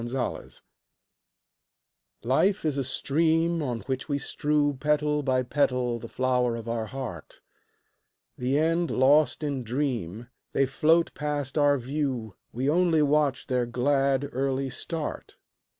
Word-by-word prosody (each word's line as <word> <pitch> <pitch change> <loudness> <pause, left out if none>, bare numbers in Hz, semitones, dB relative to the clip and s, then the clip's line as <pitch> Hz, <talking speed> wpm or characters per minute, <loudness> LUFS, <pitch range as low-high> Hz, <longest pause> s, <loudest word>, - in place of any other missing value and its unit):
Petals 120 +1 -4 1.6
Life 180 - +2
is 150 -3 +1
a - - 0
stream 165 +5 +1
On 120 -6 -3
which 130 +7 -4
we 140 - +1
strew 145 0 0
Petal 150 0 +1
by 130 -2 +1
petal 125 -3 0
the 115 - -8
flower 125 -1 0
of 115 -1 -7
our 115 -1 -2
heart; 120 - -7 1.0
The 130 +3 0
end 165 +2 +1
lost 140 +2 +3
in 140 -3 -2
dream, 120 - -3 0.3
They 135 - +3
float 160 +5 +2
past 145 -3 -3
our 145 -2 +4
view, 130 -4 -3 0.2
We 130 +3 -2
only 165 0 +3
watch 145 -2 +1
their 125 -2 0
glad, 135 +2 +1
early 135 0 -1
start. 160 +2 -5
135 Hz, 130 wpm, -27 LUFS, 125-150 Hz, 1.6 s, our